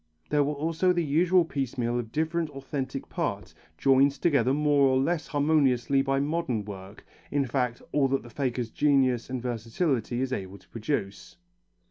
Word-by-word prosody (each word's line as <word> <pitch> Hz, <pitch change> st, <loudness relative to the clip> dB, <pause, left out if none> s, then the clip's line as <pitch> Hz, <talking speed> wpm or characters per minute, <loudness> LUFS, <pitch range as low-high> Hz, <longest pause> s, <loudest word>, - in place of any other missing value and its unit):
There 150 Hz, -1 st, +4 dB
was 145 Hz, +1 st, -2 dB
also 165 Hz, +4 st, +1 dB
the 175 Hz, -1 st, 0 dB
usual 170 Hz, +4 st, +3 dB
piecemeal 125 Hz, -5 st, -2 dB
of 115 Hz, -2 st, -6 dB
different 160 Hz, +1 st, -1 dB
authentic 135 Hz, -1 st, -5 dB
parts, -, -, -3 dB, 0.2 s
joined 135 Hz, +1 st, +4 dB
together 140 Hz, -4 st, +2 dB
more 145 Hz, -1 st, +3 dB
or 130 Hz, 0 st, +3 dB
less 160 Hz, +4 st, 0 dB
harmoniously 140 Hz, -3 st, +2 dB
by 135 Hz, 0 st, 0 dB
modern 140 Hz, -7 st, -1 dB
work, 95 Hz, 0 st, -10 dB, 0.2 s
in 145 Hz, -1 st, +1 dB
fact 125 Hz, -2 st, -2 dB
all 145 Hz, -2 st, +3 dB
that 135 Hz, +1 st, -1 dB
the 120 Hz, -, -12 dB
faker's 125 Hz, -4 st, -2 dB
genius 135 Hz, -5 st, +2 dB
and 130 Hz, 0 st, -3 dB
versatility 120 Hz, -, -2 dB
is 130 Hz, 0 st, -1 dB
able 95 Hz, -3 st, -5 dB
to -, -, -23 dB
produce. 110 Hz, -4 st, -4 dB
135 Hz, 160 wpm, -27 LUFS, 120-150 Hz, 0.2 s, There